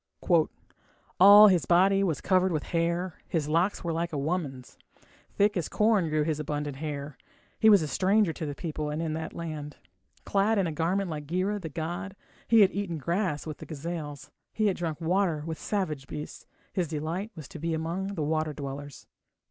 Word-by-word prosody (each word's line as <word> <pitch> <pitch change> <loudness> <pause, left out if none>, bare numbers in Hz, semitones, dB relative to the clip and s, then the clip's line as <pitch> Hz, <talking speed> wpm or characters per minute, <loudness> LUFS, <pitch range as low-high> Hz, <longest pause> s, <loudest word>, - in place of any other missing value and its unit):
All 205 +3 +10
his 180 -4 +2
body 195 +3 +4
was 165 -7 -1
covered 185 0 +2
with 155 -3 -1
hair, 170 +1 -1
His 155 -4 -1
locks 170 +7 +1
were 170 -1 -1
like 170 +1 -2
a 150 - -3
woman's, 140 -4 -3 0.6
Thick 205 +1 +3
as 175 -4 -2
corn 210 -6 +2
grew 155 0 +1
his 155 -1 -1
abundant 145 -2 -3
hair. 145 -2 -5 0.4
He 220 - +6
was 200 -6 +6
a - - -2
stranger 195 +2 +2
to 155 - -5
the 145 - -4
people 155 -2 -4
and 150 +1 -3
in 165 -2 -2
that 160 +1 -5
land. 155 -3 -6 0.5
Clad 205 +2 +2
in 195 - +2
a 165 - -2
garment 175 +4 -1
like 150 -2 -6
Gira, 190 +5 -1
the 160 - -5
god, 175 +5 -5 0.3
He 230 -2 +6
had 195 - +6
eaten 195 -5 -3
grass 170 +1 -1
with 155 -2 -6
the - - -9
gazelles, 155 -1 -6 0.2
He 215 - +1
had 195 -3 +2
drunk 165 -3 -3
water 170 -2 +1
with 160 -1 -5
savage 155 -10 -2
beasts. 150 0 -8 0.3
His 180 -3 0
delight 165 +7 -3
was 155 -4 -9
to 160 - -9
be 165 +1 -1
among 180 +5 -3
water 155 -1 -1
dwellers. 140 -1 -7
165 Hz, 190 wpm, -28 LUFS, 150-190 Hz, 0.6 s, All